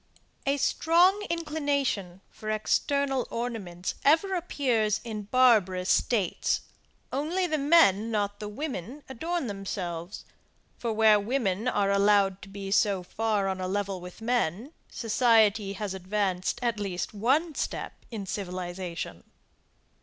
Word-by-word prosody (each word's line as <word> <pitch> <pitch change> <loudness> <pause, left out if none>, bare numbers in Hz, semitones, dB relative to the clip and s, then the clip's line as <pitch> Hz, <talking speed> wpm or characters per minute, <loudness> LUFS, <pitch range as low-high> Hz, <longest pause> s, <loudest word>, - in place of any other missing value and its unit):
A 280 +1 +2
strong 345 +7 +3
inclination 285 - -1
for 215 - -7
external 270 +5 0
ornaments 205 -7 -4
ever 325 +7 +4
appears 250 - 0
in 215 -3 -5
barbarous 205 -6 +3
states, 205 -8 +1 0.5
only 320 +7 0
the 310 -3 0
men 275 - +5
not 205 -2 -1
the 210 - -5
women 260 - -5
adorn 330 +5 -3
themselves; 190 -4 -5 0.5
for 235 - -2
where 215 -1 +5
women 215 -1 -1
are 200 -5 +1
allowed 200 -1 +3
to 195 - -11
be 195 0 -6
so 195 -2 +2
far 210 +1 -1
on 190 -1 -2
a 185 - -2
level 195 -1 -2
with 180 +4 -10
men, 240 - -1 0.2
society 220 -3 +3
has 200 -1 -4
advanced 190 -1 -1
at 235 -3 0
least 190 -2 -3
one 275 +11 +1
step - - -3 0.2
in 215 -4 -5
civilization. 180 - -5
215 Hz, 125 wpm, -28 LUFS, 195-265 Hz, 0.5 s, men